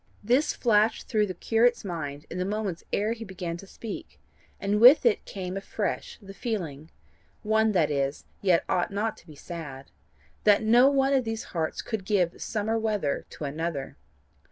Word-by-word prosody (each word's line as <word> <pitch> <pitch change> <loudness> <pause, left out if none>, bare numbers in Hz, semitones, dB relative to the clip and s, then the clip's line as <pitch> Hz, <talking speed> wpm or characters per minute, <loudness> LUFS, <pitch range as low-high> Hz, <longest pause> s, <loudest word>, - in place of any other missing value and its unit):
This 250 +8 +2
flashed 220 -2 +2
through 210 -1 +2
the 185 - -5
curate's 235 +4 +2
mind 145 -5 -5
in 180 - -4
the - - +1
moments 200 -3 -3
ere 215 +3 +1
he 230 -1 -8
began 185 -4 -5
to 195 - -12
speak, 220 +2 -8 0.4
and 205 +1 0
with 255 +4 +9
it 235 - +3
came 185 -2 -5
afresh 200 +1 -3
the 195 -2 -11
feeling 165 - -4 0.5
one 220 0 +3
that 160 -6 +2
is, 140 0 -1 0.2
yet 180 -4 +3
ought 180 -2 +1
not 210 +2 -1
to - - -19
be 155 - -12
sad 145 -5 -8 0.5
that 210 0 +5
no 240 +5 +6
one 275 0 +2
of - - +5
all - - +2
these 225 -2 -4
hearts 160 -2 -2
could 220 -4 -3
give 185 -4 0
summer 220 +1 -1
weather 210 -10 -1
to - - -9
another. 150 -1 -3
200 Hz, 180 wpm, -27 LUFS, 170-225 Hz, 0.5 s, with